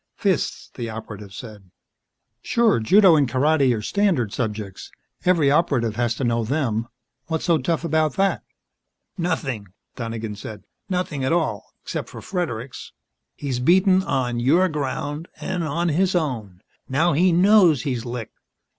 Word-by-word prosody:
"Fists," - - -1
the 115 -1 -5
Operative 105 -2 -8
said. 105 -3 -10 0.7
"Sure 230 - +2
Judo 185 - +6
and 140 -4 +2
Karate 140 0 +3
are 105 - -6
standard 170 - +1
subjects 105 -4 -4 0.3
every 165 -6 +4
Operative 135 -8 +1
has 120 0 0
to - - -4
know 115 -1 +1
them. 115 -3 -1 0.4
What's 160 -1 -2
so 170 -3 +3
tough 160 +6 -1
about 155 -3 +1
that?" 195 0 +1 0.7
"Nothing," 150 - -2 0.3
Donegan 115 -2 -5
said. 105 +1 -8 0.3
"Nothing 180 -7 -2
at 130 - 0
all 155 - -1
except - - -4
for - - -9
Fredericks. 140 - -5 0.4
He's 135 -4 -3
been 125 - -3
beaten 185 +2 +5
on 130 -8 -1
your 160 +10 +4
ground, 145 +1 -3
and 180 -2 -3
on 170 +3 -1
his 185 +4 +1
own. 115 - -2 0.3
Now 155 +6 +2
he 180 +5 +4
knows 180 - +5
he's 125 -5 -2
licked. 120 -2 -7
140 Hz, 145 wpm, -23 LUFS, 115-170 Hz, 0.7 s, Judo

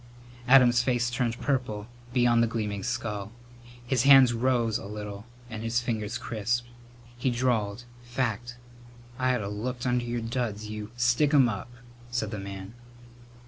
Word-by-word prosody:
Adam's 125 -2 +6
face 120 -1 0
turned 120 -1 -1
purple 120 -6 -1 0.3
beyond 120 -2 +4
the 115 - +3
gleaming 105 -3 -3
skull. 105 -2 -3 0.5
His 125 0 +1
hands 135 -2 +7
rose 120 -2 +1
a - - -8
little 105 +1 -7 0.2
and 110 -2 -6
his 115 +1 0
fingers 110 -2 -2
crisped. 120 +2 -2 0.5
He 120 +2 0
drawled, 120 -3 0 0.2
"Fact. 120 -1 -3 0.6
I 130 0 +2
ought 125 - -2
have 100 0 -4
looked 120 +4 -4
under 125 -1 +1
your 120 0 -3
duds, 115 -3 -3
you 105 -1 -6
" - - -21
"Stick 120 +5 +3
'em 135 -3 +6
up!" 110 0 -4 0.4
said 115 -3 -2
the 105 - -4
man. 95 +1 -7
120 Hz, 155 wpm, -28 LUFS, 105-125 Hz, 0.6 s, hands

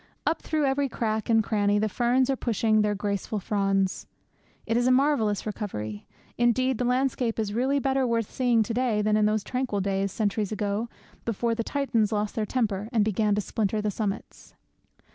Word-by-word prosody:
Up 315 +2 0
through 310 -2 0
every 275 0 +1
crack 220 -1 -2
and 225 -1 +4
cranny 205 -1 +1
the 215 +1 +1
ferns 245 +4 +2
are - - +1
pushing 220 -3 +1
their 210 0 +1
graceful 205 +1 -2
fronds. 195 -1 0 0.6
It 225 - 0
is 245 +1 +2
a - - +5
marvellous 255 -7 +2
recovery. 110 - -5 0.3
Indeed, 240 +1 +2
the 250 - 0
landscape 250 -2 0
is 215 -2 -2
really 260 +5 +1
better 270 -1 +1
worth 230 -2 -1
seeing 240 -3 +2
to 225 - -4
day 235 -4 +1
than 210 0 +2
in 210 0 +3
those 215 -1 0
tranquil 250 -3 -2
days, 195 0 -1
centuries 210 0 -1
ago, 210 +2 -2 0.3
before 230 +1 -1
the 230 0 -2
Titans 235 -6 0
lost 210 -1 -1
their 215 -2 -2
temper, 215 -4 -1
and 220 -4 +2
began 210 0 +1
to 210 - 0
splinter 215 0 -1
the 210 0 -1
summits. 205 0 -5
220 Hz, 185 wpm, -26 LUFS, 205-245 Hz, 0.6 s, a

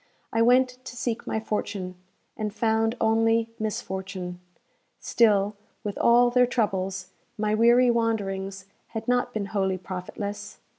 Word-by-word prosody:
I 225 - +2
went 250 +1 +3
to 255 - -8
seek 235 -1 -3
my 220 - -1
fortune, 200 -4 -3 0.4
and 215 -1 -3
found 225 +2 +1
only 225 +1 +2
misfortune. 190 -4 -4 0.6
Still, 205 -3 +3 0.3
with 205 -1 -3
all 240 +1 +5
their 250 0 +4
troubles, 190 -5 -1 0.3
my 215 0 0
weary 240 +3 +5
wanderings 195 -4 -1 0.2
had 225 +1 -6
not 245 0 +1
been 215 -4 -2
wholly 190 -2 +1
profitless. 190 +3 -6
220 Hz, 130 wpm, -26 LUFS, 195-235 Hz, 0.6 s, all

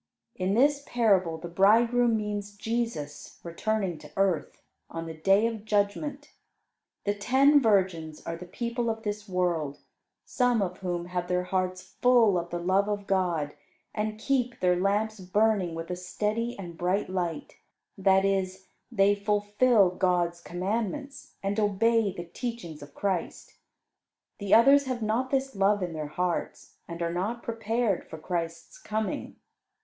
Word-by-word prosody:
In 190 +2 -1
this 285 +3 +3
parable 195 -9 +2
the 165 +2 -7
bridegroom 230 +6 +4
means 205 -1 -4
Jesus 225 -11 -4
returning 185 0 -2
to 150 - -13
earth, 190 -5 0 0.3
on 165 0 -5
the 165 - -6
Day 195 +7 +3
of 225 -2 -3
Judgment. 220 +8 -1 0.7
The 205 - +1
ten 270 +8 +4
virgins 185 - +1
are 165 - -3
the 175 +2 -10
people 235 +4 -2
of 225 0 -3
this 210 -1 -4
world, 170 -6 0 0.5
some 245 -2 +2
of 185 -2 -2
whom 175 -2 -3
have 180 0 -3
their 180 0 0
hearts 185 0 -2
full 225 +1 +3
of 170 0 -6
the 175 - -3
love 190 +4 +1
of 205 -1 -2
God 175 -7 0 0.4
and 215 0 -2
keep 250 0 0
their 180 -1 +3
lamps 205 +4 0
burning 190 -2 +1
with 165 +2 -5
a - - -1
steady 210 +6 -2
and 175 -4 -8
bright 185 +3 0
light; 175 -4 -3 0.4
that 195 0 +3
is, 190 -1 -1 0.2
they 195 +1 +4
fulfil 205 +1 +3
God's 175 -2 0
commandments 225 +11 -4
and 200 +2 -1
obey 215 +1 +2
the 175 -2 -7
teachings 175 - -6
of 145 0 -12
Christ. 190 -4 -3 0.9
The 200 -2 -4
others 275 +5 +7
have 255 -3 -3
not 230 +5 0
this 270 -2 -1
love 200 0 +2
in 175 -2 -3
their 155 -1 -4
hearts, 180 +3 -3
and 170 0 -5
are 170 0 -1
not 210 +7 -2
prepared 225 -2 -1
for 160 - -7
Christ's 170 - -4
coming. 215 - -3
195 Hz, 150 wpm, -28 LUFS, 180-225 Hz, 0.9 s, others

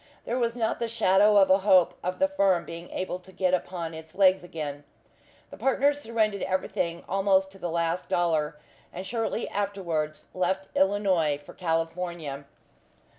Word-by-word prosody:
There 245 - -1
was 235 -1 0
not 225 -2 -1
the 235 - -1
shadow 210 -2 +4
of 195 -1 +6
a 190 - +6
hope 185 -3 +4
of 180 +1 -2
the 285 - +3
firm 195 -11 +2
being 170 +1 -8
able 185 -1 -3
to 190 +1 -16
get 185 -1 0
upon 175 -2 -2
its 160 0 -11
legs 190 -2 +4
again. 150 -4 -6 0.7
The - - -9
partners 285 +2 +2
surrendered 220 -4 0
everything 175 -2 -2
almost 195 0 +2
to 195 - -15
the 175 - -3
last 170 +1 -1
dollar, 160 -3 +1 0.3
and 185 +2 -7
shortly 225 +2 -2
afterwards 175 -7 -2
left 190 +1 -2
Illinois 190 -7 +2
for 145 - -14
California. 165 -3 -3
185 Hz, 160 wpm, -27 LUFS, 170-200 Hz, 0.7 s, of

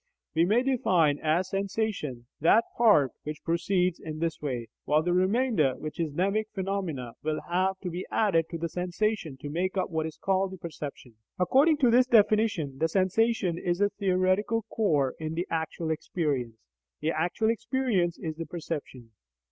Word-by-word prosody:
We 165 +1 +3
may 220 +7 +3
define 180 - +2
as 170 +4 +1
"sensation" 195 - -2
that 190 +9 +5
part 205 - +5
which 150 +1 -7
proceeds 180 +1 +1
in 155 -1 -6
this 165 0 -2
way, 125 -6 -3 0.2
while 150 +2 +3
the 175 +1 +1
remainder, 185 - +2
which 155 +2 -7
is 165 -2 0
a - - -14
mnemic 200 +5 +1
phenomenon, 185 - -3
will 155 0 -1
have 185 +2 +1
to 180 - -4
be 180 +2 -5
added 165 -7 +2
to 170 - -4
the 170 +1 -2
sensation 180 -2 -2
to 140 - -8
make 185 +4 -1
up 185 - -1
what 160 -1 -1
is 160 - -9
called 190 0 0
the - - -7
"perception." 145 - -8 0.2
According 275 - +4
to 245 -3 +5
this 250 +2 +5
definition, 210 - +3
the 160 - +2
sensation 190 0 +1
is 175 0 -1
a 205 0 +3
theoretical 200 +3 +1
core 150 - +1
in 155 0 -4
the 175 +2 -1
actual 160 0 -2
experience; 140 -8 -2 0.4
the 155 +2 0
actual 175 +8 +1
experience 230 -7 0
is 160 -2 -5
the 165 - -5
perception. 145 -8 -6
175 Hz, 170 wpm, -28 LUFS, 155-200 Hz, 0.4 s, that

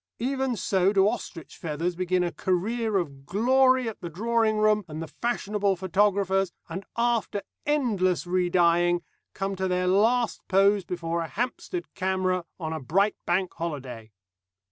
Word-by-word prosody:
Even 265 +1 -1
so 190 -2 +2
do 195 -1 +4
ostrich 165 -5 -5
feathers 165 +2 -2
begin 185 0 +1
a 175 - -1
career 210 +5 0
of 140 -6 -4
glory 255 +5 +3
at 220 - -6
the 170 - -5
Drawing 220 +4 +1
Room 215 0 +3
and 155 -1 -7
the 165 - -4
fashionable 205 -3 -1
photographer's, 195 0 +1 0.2
and, 185 +4 -5
after 235 -4 0 0.2
endless 210 - +1
re 180 0 +1
dyeing, 175 0 +3 0.3
come 195 0 -2
to 190 0 -1
their 180 0 0
last 225 +6 +2
pose 195 0 +3
before 170 -1 -2
a 165 - -3
Hampstead 345 - -4
camera 185 -1 0
on 160 -2 -3
a 160 - -3
bright 195 - +1
Bank 180 +1 +1
Holiday. 130 -9 -6
190 Hz, 150 wpm, -26 LUFS, 175-215 Hz, 0.3 s, do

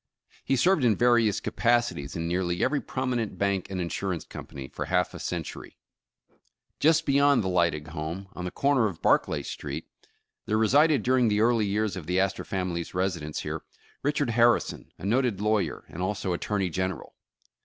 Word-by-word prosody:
He 135 - +1
served 170 +3 +3
in 115 -4 +4
various 120 -3 +3
capacities 120 - 0
in 85 0 -2
nearly 90 0 0
every 145 - +1
prominent 125 -4 -2
bank 100 -2 0
and 95 -1 -3
insurance 90 0 -3
company, 65 -1 -8
for - - -5
half - - +1
a - - -8
century. - - -5 1.0
Just 160 +1 +4
beyond 140 -3 +4
the - - -2
Lydig 85 -4 +1
home, 85 +5 -5
on 90 - -6
the 90 - -2
corner 140 +1 +2
of 95 -6 -6
Bar - - +6
clay - - -4
Street, - - -6 0.6
there 110 - +1
resided 145 +7 +4
during 125 -1 +3
the 105 0 +2
early 115 -2 +3
years 105 -1 0
of 90 -5 -7
the 90 +1 +1
Astor 95 0 0
family's 90 -3 -3
residence 85 -5 -2
here, - - -4 0.4
Richard 145 -3 0
Harrison, 120 +1 +2
a - - -8
noted 120 -1 +1
lawyer, 105 0 0
and 85 - -8
also 95 -1 -1
Attorney 95 +1 -1
General. 95 +1 -3
100 Hz, 170 wpm, -27 LUFS, 90-120 Hz, 1.0 s, Bar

